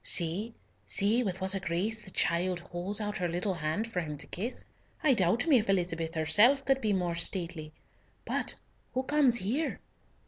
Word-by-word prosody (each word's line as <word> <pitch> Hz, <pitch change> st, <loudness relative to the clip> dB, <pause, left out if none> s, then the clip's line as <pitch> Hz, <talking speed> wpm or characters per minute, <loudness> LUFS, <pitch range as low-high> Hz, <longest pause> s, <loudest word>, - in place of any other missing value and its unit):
See! 185 Hz, +7 st, +3 dB, 0.3 s
see! 205 Hz, -, +3 dB
with 190 Hz, -5 st, -2 dB
what 190 Hz, 0 st, 0 dB
a 195 Hz, -, -1 dB
grace 195 Hz, +5 st, -2 dB
the 210 Hz, -, -9 dB
child 180 Hz, 0 st, +1 dB
holds 180 Hz, +3 st, -4 dB
out 210 Hz, -1 st, -3 dB
her 180 Hz, -, 0 dB
little 180 Hz, +4 st, -1 dB
hand 165 Hz, +5 st, -2 dB
for 180 Hz, -, 0 dB
him 150 Hz, -3 st, -5 dB
to -, -, -8 dB
kiss. 225 Hz, +8 st, -5 dB, 0.4 s
I 290 Hz, -4 st, +5 dB
doubt 220 Hz, -, +2 dB
me 290 Hz, -7 st, +5 dB
if 215 Hz, -, -4 dB
Elizabeth 165 Hz, -3 st, 0 dB
herself 225 Hz, -, +4 dB
could 270 Hz, 0 st, +2 dB
be 215 Hz, -, +1 dB
more 180 Hz, -3 st, 0 dB
stately. 170 Hz, -2 st, -4 dB, 0.5 s
But -, -, -1 dB, 0.4 s
who 260 Hz, -, +1 dB
comes 280 Hz, -3 st, +4 dB
here?" 240 Hz, +10 st, -1 dB
190 Hz, 180 wpm, -30 LUFS, 170-225 Hz, 0.5 s, I